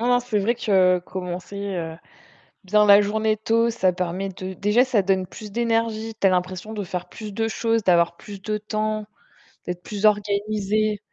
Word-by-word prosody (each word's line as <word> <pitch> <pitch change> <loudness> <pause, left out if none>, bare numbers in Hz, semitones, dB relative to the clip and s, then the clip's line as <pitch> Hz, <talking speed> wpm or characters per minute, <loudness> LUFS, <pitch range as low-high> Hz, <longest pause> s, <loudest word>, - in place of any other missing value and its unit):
Non, 240 - 0
non, 245 0 +4
c'est 240 -4 -1
vrai 220 +4 +1
que 190 -6 +3
commencer, 180 +2 -6 0.2
heu, 165 -2 -4 0.7
bien 210 +2 +4
la 200 0 +8
journée 215 +1 +1
tôt, 230 +2 +2
ça 185 -4 +1
permet 180 +2 -3
de 185 0 -6
déjà, 210 +6 +3
ça 245 -6 +2
donne 185 -1 +1
plus 210 +3 -10
d'énergie. 225 0 -1
Tu - - +4
as 190 - +5
l'impression 185 +3 -2
de 205 - -3
faire 180 -1 -5
plus 215 -2 -8
de 225 +2 -1
choses, 225 0 0
d'avoir 170 -3 +3
plus 200 -2 -10
de 215 +1 -2
temps, 215 0 -2 0.6
d'être 180 0 -4
plus 205 +1 -6
organisée. 210 0 +1
210 Hz, 185 wpm, -23 LUFS, 185-220 Hz, 0.7 s, la